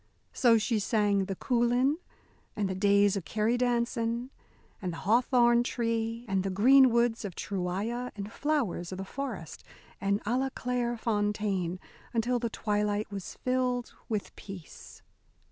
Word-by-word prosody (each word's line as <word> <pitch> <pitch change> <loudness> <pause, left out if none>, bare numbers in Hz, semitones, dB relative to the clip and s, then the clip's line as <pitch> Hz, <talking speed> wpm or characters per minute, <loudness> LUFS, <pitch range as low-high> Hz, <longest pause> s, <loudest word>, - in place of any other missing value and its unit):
So 235 -3 +5
she 220 +1 +1
sang 205 -2 +2
"The 195 - -4
Coulin," 245 - +2 0.6
and 205 -2 0
"The 190 - -2
Days 200 +1 +4
o' - - 0
the - - -12
Kerry 215 +5 0
Dancin'," 240 0 0 0.5
and 180 -3 -3
"The - - -6
Hawthorn 240 +2 +4
Tree," 230 -1 -2
and 195 -1 +1
"The 195 - -1
Green 260 +8 +6
Woods 235 -1 +1
of 195 -4 -5
Truigha," 200 +6 -3
and 205 +1 -6
"Flowers 245 - -1
o' - - -4
the 190 +1 -5
Forest," 225 - -6 0.4
and 200 +1 +1
"A 235 +4 +1
la 270 0 0
claire 245 -2 -2
Fontaine," 205 -5 -1 0.4
until 240 +2 +1
the 235 -1 -1
twilight 210 -1 -1
was 195 -2 -6
filled 250 -1 0 0.2
with 215 -3 -3
peace. 190 -6 -11
225 Hz, 150 wpm, -29 LUFS, 200-245 Hz, 0.6 s, Green